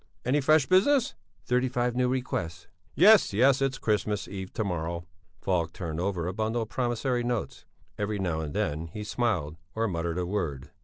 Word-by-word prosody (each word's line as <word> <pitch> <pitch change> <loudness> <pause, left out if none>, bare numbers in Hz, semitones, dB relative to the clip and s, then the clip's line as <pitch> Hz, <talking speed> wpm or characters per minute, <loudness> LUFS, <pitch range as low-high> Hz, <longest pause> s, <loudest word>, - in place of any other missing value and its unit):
Any 140 +4 +2
fresh 155 0 +4
business?" 255 - +3 0.3
"Thirty 125 +1 +1
five 125 0 0
new 125 0 +2
requests." 90 -10 -3 0.3
"Yes, 215 - +6
yes, 130 +5 +4
it's 135 -1 0
Christmas 105 -2 -1
Eve 95 -1 -6
to 110 - -1
morrow." 85 -2 -3 0.4
Falk 85 -3 0
turned 85 -3 -5
over 90 -2 -1
a 90 - -2
bundle 110 +3 -1
of 110 - -10
promissory 120 0 -1
notes; 120 -2 -3 0.3
every 105 0 -1
now 90 -5 -1
and 75 -2 -5
then 80 +3 -1
he 105 +6 -7
smiled, 105 -9 -1 0.2
or 115 +1 +1
muttered 85 -2 -2
a 90 - -1
word. 75 -8 -3
105 Hz, 175 wpm, -28 LUFS, 85-125 Hz, 0.4 s, Yes